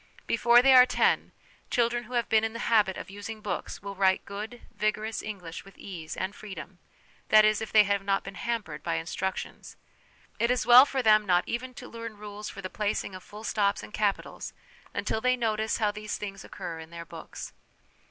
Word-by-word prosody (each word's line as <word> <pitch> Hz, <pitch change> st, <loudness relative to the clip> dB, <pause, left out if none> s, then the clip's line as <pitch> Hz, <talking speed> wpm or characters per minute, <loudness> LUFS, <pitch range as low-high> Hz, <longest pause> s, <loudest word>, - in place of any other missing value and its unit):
Before 240 Hz, +1 st, +5 dB
they 270 Hz, 0 st, +7 dB
are 255 Hz, -1 st, +9 dB
ten, -, -, +2 dB, 0.4 s
children 240 Hz, 0 st, +1 dB
who 245 Hz, -, -11 dB
have 240 Hz, -1 st, +1 dB
been 220 Hz, 0 st, +3 dB
in 225 Hz, 0 st, -1 dB
the 230 Hz, -, -4 dB
habit 205 Hz, -4 st, +4 dB
of -, -, -8 dB
using 205 Hz, +2 st, -7 dB
books 210 Hz, -2 st, -5 dB
will 200 Hz, 0 st, -5 dB
write 190 Hz, -1 st, +2 dB
good, 215 Hz, +4 st, -7 dB
vigorous 215 Hz, +1 st, -1 dB
English 180 Hz, -6 st, -7 dB
with 195 Hz, -, -16 dB
ease 165 Hz, -5 st, -7 dB
and 190 Hz, +2 st, -2 dB
freedom; 190 Hz, -4 st, -9 dB, 0.5 s
that 215 Hz, 0 st, +7 dB
is, 215 Hz, 0 st, +3 dB
if 220 Hz, -, -5 dB
they 215 Hz, -1 st, +7 dB
have 200 Hz, 0 st, 0 dB
not 195 Hz, 0 st, +1 dB
been 195 Hz, -, -8 dB
hampered 230 Hz, +3 st, -3 dB
by 170 Hz, -, -1 dB
instructions. 170 Hz, +3 st, -4 dB, 0.6 s
It 235 Hz, -, +2 dB
is 250 Hz, -3 st, +1 dB
well 245 Hz, +3 st, +9 dB
for 265 Hz, -2 st, -1 dB
them 215 Hz, -2 st, +5 dB
not 180 Hz, -1 st, +4 dB
even 255 Hz, +1 st, -4 dB
to -, -, -9 dB
learn 230 Hz, -2 st, -8 dB
rules 210 Hz, 0 st, -7 dB
for 195 Hz, -, -9 dB
the -, -, -2 dB
placing 210 Hz, -2 st, -2 dB
of 185 Hz, -, -8 dB
full 210 Hz, +3 st, -11 dB
stops 200 Hz, -2 st, 0 dB
and -, -, -11 dB
capitals 205 Hz, -2 st, -2 dB, 0.4 s
until 220 Hz, -, -2 dB
they 255 Hz, +1 st, +3 dB
notice 220 Hz, -2 st, 0 dB
how 210 Hz, -2 st, +1 dB
these 210 Hz, 0 st, -5 dB
things 200 Hz, -1 st, -6 dB
occur 165 Hz, -1 st, -7 dB
in 160 Hz, 0 st, -10 dB
their 170 Hz, 0 st, -8 dB
books. -, -, -9 dB
210 Hz, 200 wpm, -28 LUFS, 195-230 Hz, 0.6 s, are